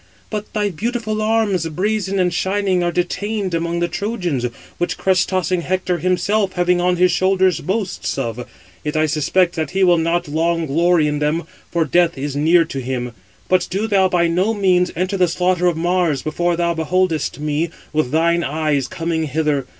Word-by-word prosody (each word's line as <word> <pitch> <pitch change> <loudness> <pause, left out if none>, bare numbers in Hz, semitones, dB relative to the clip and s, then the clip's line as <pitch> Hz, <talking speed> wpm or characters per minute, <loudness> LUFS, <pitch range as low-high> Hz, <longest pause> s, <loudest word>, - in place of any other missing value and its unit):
But 210 -1 -4
thy 210 -2 0
beautiful 215 +3 -2
arms, 215 -6 +1
brazen 195 +3 -1
and 180 -2 +1
shining, 190 0 0
are 175 - 0
detained 190 +3 -2
among 170 +1 -1
the 175 - +2
Trojans, 180 - -2 0.4
which 175 - -1
crest 185 -2 +2
tossing 185 -1 0
Hector 185 0 -1
himself, 185 +3 +1
having 180 0 +2
on 180 0 +2
his 180 +1 +3
shoulders, 185 0 +2
boasts 140 - -2
of: 120 +1 -4 0.3
yet 150 +1 -2
I 155 - +3
suspect 155 +4 +1
that 160 -3 -1
he 190 +1 +1
will 175 -2 +5
not 170 +1 0
long 165 +2 0
glory 165 +2 +2
in 150 0 -1
them, 150 +3 0 0.3
for 170 -2 0
death 170 +1 +2
is 140 +1 -4
near 165 +4 +4
to 135 - -5
him. 125 -1 -3 0.4
But 185 -1 +2
do 195 +4 -1
thou 195 -3 +3
by 175 -1 +2
no 185 +7 +1
means 185 -3 +2
enter 185 +4 -1
the 180 -1 +3
slaughter 180 +1 +1
of 170 -2 +1
Mars 175 -3 +1
before 175 +3 0
thou 170 0 0
beholdest 165 0 0
me 150 +2 -1 0.2
with 155 -4 +1
thine 170 +3 +2
eyes 150 -3 0
coming 165 0 -2
hither. 150 -2 -1
175 Hz, 180 wpm, -19 LUFS, 160-185 Hz, 0.4 s, will